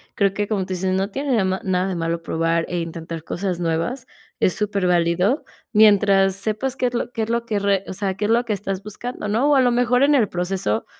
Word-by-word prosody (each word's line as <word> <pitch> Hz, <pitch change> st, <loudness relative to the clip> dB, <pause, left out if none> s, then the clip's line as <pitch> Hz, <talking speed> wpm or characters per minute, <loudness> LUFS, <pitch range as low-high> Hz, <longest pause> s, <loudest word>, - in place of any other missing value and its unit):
creo 200 Hz, -1 st, +2 dB
que 205 Hz, +1 st, -2 dB
como 210 Hz, -2 st, -1 dB
tú 185 Hz, -, -4 dB
dices, 185 Hz, +1 st, -1 dB
no 195 Hz, +1 st, 0 dB
tiene 270 Hz, +4 st, -1 dB
de 215 Hz, -, +2 dB
ma 190 Hz, 0 st, 0 dB
nada 185 Hz, 0 st, 0 dB
de 185 Hz, -, -2 dB
malo 165 Hz, 0 st, -2 dB
probar 165 Hz, 0 st, 0 dB
e 175 Hz, -, -2 dB
intentar 165 Hz, -1 st, -6 dB
cosas 180 Hz, -1 st, -3 dB
nuevas 170 Hz, +10 st, -2 dB, 0.3 s
es 185 Hz, -, +3 dB
super 200 Hz, -3 st, -1 dB
válido. 180 Hz, -, +2 dB, 0.3 s
Mientras 200 Hz, -3 st, +5 dB
sepas 220 Hz, +6 st, -2 dB
qué 255 Hz, -, 0 dB
es 245 Hz, -, -4 dB
lo 240 Hz, 0 st, -2 dB
qué 225 Hz, -2 st, -2 dB
es 220 Hz, -, -4 dB
lo 235 Hz, 0 st, 0 dB
que 215 Hz, -3 st, -1 dB
re 200 Hz, -1 st, +1 dB
o -, -, -4 dB
sea, 195 Hz, 0 st, -2 dB
qué 210 Hz, -, -2 dB
es 215 Hz, -, +1 dB
lo 235 Hz, +1 st, +3 dB
que 220 Hz, -, -1 dB
estás 195 Hz, -1 st, -4 dB
buscando, 210 Hz, +2 st, -6 dB
¿no? 230 Hz, +8 st, +2 dB
O -, -, +5 dB
a -, -, +5 dB
lo 250 Hz, -1 st, +3 dB
mejor 245 Hz, +1 st, +2 dB
en 290 Hz, +1 st, +4 dB
el 225 Hz, -8 st, +3 dB
proceso 175 Hz, -, -1 dB
195 Hz, 250 wpm, -21 LUFS, 180-230 Hz, 0.3 s, Mientras